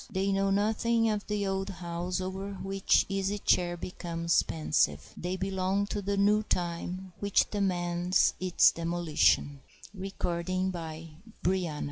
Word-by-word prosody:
They 195 Hz, -1 st, 0 dB
know 195 Hz, 0 st, +1 dB
nothing 220 Hz, +3 st, +2 dB
of 210 Hz, -1 st, -3 dB
the 210 Hz, -1 st, -1 dB
old 195 Hz, 0 st, -2 dB
house 175 Hz, 0 st, -4 dB
over 190 Hz, +2 st, -4 dB
which 195 Hz, 0 st, +1 dB
the 195 Hz, -, -3 dB
Easy 195 Hz, +1 st, -1 dB
Chair 175 Hz, -3 st, +1 dB
becomes 170 Hz, -1 st, 0 dB
pensive. 110 Hz, -, 0 dB
They 180 Hz, +2 st, -3 dB
belong 190 Hz, +1 st, 0 dB
to 205 Hz, -, -2 dB
the 200 Hz, +1 st, -1 dB
new 205 Hz, +2 st, +4 dB
time, 180 Hz, 0 st, -3 dB
which 200 Hz, -1 st, +2 dB
demands 180 Hz, -3 st, +1 dB
its 185 Hz, -1 st, +5 dB
demolition. 165 Hz, -4 st, +1 dB, 0.6 s
PRO 170 Hz, -1 st, -1 dB
190 Hz, 125 wpm, -29 LUFS, 175-200 Hz, 0.6 s, its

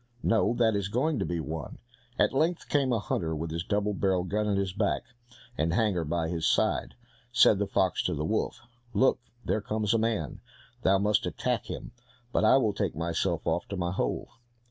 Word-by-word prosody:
"No, 115 Hz, +1 st, +2 dB
that 115 Hz, -3 st, +3 dB
is 100 Hz, -1 st, -1 dB
going 130 Hz, +8 st, 0 dB
to -, -, 0 dB
be 85 Hz, -1 st, -2 dB
one." 80 Hz, -2 st, -5 dB, 0.4 s
At -, -, +3 dB
length 160 Hz, +5 st, 0 dB
came 140 Hz, -3 st, +2 dB
a 120 Hz, -, +3 dB
hunter 85 Hz, -5 st, -2 dB
with 80 Hz, +1 st, -4 dB
his 85 Hz, +1 st, -2 dB
double 105 Hz, +2 st, 0 dB
barrelled 95 Hz, -2 st, 0 dB
gun 105 Hz, +3 st, 0 dB
at 100 Hz, -1 st, +1 dB
his 95 Hz, -2 st, -1 dB
back, 100 Hz, +1 st, 0 dB, 0.6 s
and 80 Hz, +2 st, +1 dB
hanger 100 Hz, -6 st, +1 dB
by 80 Hz, +1 st, -1 dB
his 80 Hz, -1 st, -1 dB
side. -, -, +1 dB, 0.4 s
Said 115 Hz, -4 st, +5 dB
the 100 Hz, -, 0 dB
fox 95 Hz, -3 st, +1 dB
to -, -, 0 dB
the 75 Hz, -, -2 dB
wolf, 110 Hz, +4 st, -1 dB, 0.3 s
"Look, 130 Hz, -, +4 dB, 0.3 s
there 110 Hz, -, 0 dB
comes 105 Hz, +1 st, 0 dB
a 115 Hz, -, +3 dB
man, 110 Hz, -9 st, -1 dB, 0.4 s
thou 95 Hz, -2 st, +4 dB
must 105 Hz, +1 st, +2 dB
attack -, -, -2 dB
him, -, -, -6 dB, 0.4 s
but -, -, +1 dB
I 110 Hz, -, +6 dB
will 110 Hz, -6 st, +2 dB
take 100 Hz, -3 st, -2 dB
myself 85 Hz, +1 st, -1 dB
off 85 Hz, +1 st, 0 dB
to 100 Hz, -, -5 dB
my 90 Hz, -1 st, -1 dB
hole." 95 Hz, -, -2 dB
100 Hz, 200 wpm, -28 LUFS, 85-110 Hz, 0.6 s, I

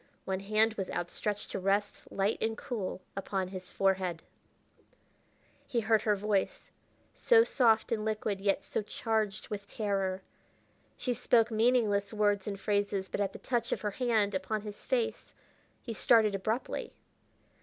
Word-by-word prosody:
One 190 Hz, -1 st, -1 dB
hand 215 Hz, +3 st, +2 dB
was 195 Hz, -4 st, -4 dB
outstretched 205 Hz, +4 st, -3 dB
to -, -, -2 dB
rest, 200 Hz, +2 st, -1 dB
light 200 Hz, +3 st, 0 dB
and 220 Hz, 0 st, 0 dB
cool, 200 Hz, -6 st, -4 dB
upon 190 Hz, -1 st, -2 dB
his 185 Hz, -1 st, -7 dB
forehead. 185 Hz, -3 st, 0 dB, 1.4 s
He 235 Hz, -, 0 dB
heard 220 Hz, -1 st, +3 dB
her 210 Hz, -1 st, +2 dB
voice, 205 Hz, -1 st, -1 dB, 0.4 s
so 460 Hz, -2 st, +5 dB
soft 230 Hz, -, +3 dB
and 220 Hz, -2 st, 0 dB
liquid 215 Hz, -2 st, -1 dB
yet 195 Hz, 0 st, +1 dB
so -, -, -2 dB
charged 215 Hz, -1 st, -2 dB
with 200 Hz, -1 st, -6 dB
terror. 195 Hz, -3 st, -1 dB, 0.7 s
She 250 Hz, -, -1 dB
spoke 230 Hz, 0 st, +3 dB
meaningless 220 Hz, -3 st, +2 dB
words 205 Hz, -2 st, +1 dB
and 200 Hz, -1 st, -3 dB
phrases, 200 Hz, -2 st, 0 dB
but -, -, -2 dB
at 195 Hz, -1 st, 0 dB
the -, -, -9 dB
touch 240 Hz, -2 st, -1 dB
of -, -, -1 dB
her 210 Hz, -, -1 dB
hand 220 Hz, -3 st, +1 dB
upon 190 Hz, +3 st, -1 dB
his 210 Hz, -1 st, -8 dB
face 485 Hz, -2 st, -1 dB, 0.5 s
he 235 Hz, -, -4 dB
started 220 Hz, -2 st, +4 dB
abruptly. 215 Hz, +5 st, -2 dB
210 Hz, 150 wpm, -31 LUFS, 195-220 Hz, 1.4 s, so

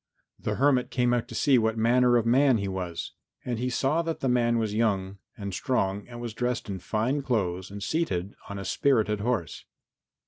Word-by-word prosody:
The -, -, -2 dB
hermit 130 Hz, -2 st, +2 dB
came 125 Hz, -1 st, +1 dB
out 120 Hz, -2 st, 0 dB
to -, -, -9 dB
see 135 Hz, -3 st, +4 dB
what 110 Hz, 0 st, 0 dB
manner 120 Hz, +2 st, +4 dB
of 115 Hz, -, +1 dB
man 130 Hz, +1 st, +4 dB
he 100 Hz, -2 st, -2 dB
was. 90 Hz, -3 st, -4 dB, 0.3 s
And 120 Hz, -3 st, -2 dB
he 125 Hz, +1 st, -1 dB
saw 135 Hz, +6 st, +1 dB
that 165 Hz, -1 st, -3 dB
the 135 Hz, -, -1 dB
man 120 Hz, -1 st, +2 dB
was 110 Hz, -2 st, -1 dB
young 100 Hz, -3 st, 0 dB, 0.2 s
and 100 Hz, -3 st, -5 dB
strong 100 Hz, -4 st, -1 dB
and 120 Hz, -1 st, -9 dB
was 120 Hz, -2 st, -5 dB
dressed 125 Hz, 0 st, -2 dB
in 95 Hz, -, -4 dB
fine 115 Hz, +10 st, -1 dB
clothes 95 Hz, -8 st, -1 dB
and 100 Hz, 0 st, -7 dB
seated 105 Hz, -, -1 dB, 0.2 s
on 100 Hz, -, -5 dB
a 95 Hz, -, -6 dB
spirited 110 Hz, -7 st, +2 dB
horse. 110 Hz, -, -2 dB
115 Hz, 200 wpm, -27 LUFS, 100-125 Hz, 0.3 s, see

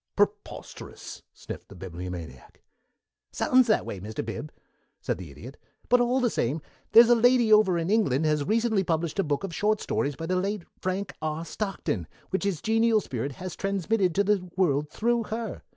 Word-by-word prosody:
"Preposterous!" -, -, -3 dB
sniffed -, -, -9 dB
the 100 Hz, -, -12 dB
Bibliomaniac. 85 Hz, -6 st, -8 dB, 0.7 s
"Sounds 255 Hz, -1 st, +3 dB
that 215 Hz, -, +2 dB
way, 100 Hz, -, -5 dB
Mr. 110 Hz, +4 st, -5 dB
Bib," 145 Hz, +7 st, -6 dB, 0.5 s
said -, -, -3 dB
the 90 Hz, -4 st, -8 dB
Idiot, 115 Hz, -, -11 dB, 0.3 s
"but, 245 Hz, 0 st, +5 dB
all 245 Hz, +2 st, +2 dB
the 250 Hz, -, +2 dB
same, 135 Hz, +7 st, 0 dB, 0.3 s
here's 230 Hz, +1 st, +9 dB
a 240 Hz, -, +6 dB
lady 240 Hz, -1 st, +5 dB
over 200 Hz, -5 st, +5 dB
in 170 Hz, +3 st, -1 dB
England 160 Hz, -, +2 dB
has 150 Hz, -1 st, +2 dB
recently 220 Hz, +2 st, +1 dB
published 165 Hz, +1 st, -1 dB
a -, -, +4 dB
book 145 Hz, +2 st, -1 dB
of 195 Hz, -3 st, -4 dB
short 210 Hz, +5 st, +1 dB
stories 140 Hz, 0 st, -1 dB
by 165 Hz, -, -5 dB
the 185 Hz, +2 st, 0 dB
late 195 Hz, +1 st, -1 dB, 0.2 s
Frank 185 Hz, +1 st, -2 dB
R. 155 Hz, +1 st, -3 dB
Stockton, 170 Hz, -, -3 dB, 0.2 s
which 190 Hz, +1 st, -1 dB
his 195 Hz, -6 st, -1 dB
genial 225 Hz, 0 st, +3 dB
spirit 135 Hz, -, -4 dB
has 185 Hz, +5 st, -7 dB
transmitted 195 Hz, -2 st, 0 dB
to 200 Hz, -, +3 dB
the 195 Hz, -3 st, 0 dB
world 150 Hz, -5 st, +2 dB
through 235 Hz, +5 st, 0 dB
her. 225 Hz, -2 st, -4 dB
185 Hz, 180 wpm, -27 LUFS, 145-215 Hz, 0.7 s, here's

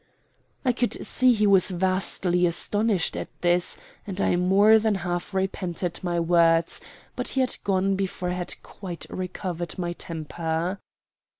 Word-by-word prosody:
I 250 Hz, -, +4 dB
could 240 Hz, 0 st, -1 dB
see 255 Hz, 0 st, +4 dB
he 215 Hz, -3 st, +2 dB
was 195 Hz, -1 st, +5 dB
vastly 185 Hz, -1 st, +1 dB
astonished 205 Hz, +2 st, 0 dB
at -, -, -4 dB
this 175 Hz, 0 st, +2 dB, 0.3 s
and 195 Hz, -1 st, -4 dB
I 180 Hz, -, +2 dB
more 200 Hz, +5 st, +5 dB
than 220 Hz, -1 st, +1 dB
half 175 Hz, +1 st, -3 dB
repented 185 Hz, -2 st, -2 dB
my 175 Hz, -2 st, -1 dB
words, 165 Hz, -1 st, +3 dB, 0.3 s
but -, -, -2 dB
he 265 Hz, -, +1 dB
had 255 Hz, -, +2 dB
gone 195 Hz, 0 st, +1 dB
before 185 Hz, -2 st, -2 dB
I -, -, -1 dB
had 180 Hz, -1 st, -4 dB
quite 180 Hz, -4 st, -7 dB
recovered 180 Hz, -2 st, -4 dB
my 175 Hz, -1 st, -2 dB
temper. 165 Hz, +2 st, -3 dB
180 Hz, 145 wpm, -25 LUFS, 175-195 Hz, 0.3 s, was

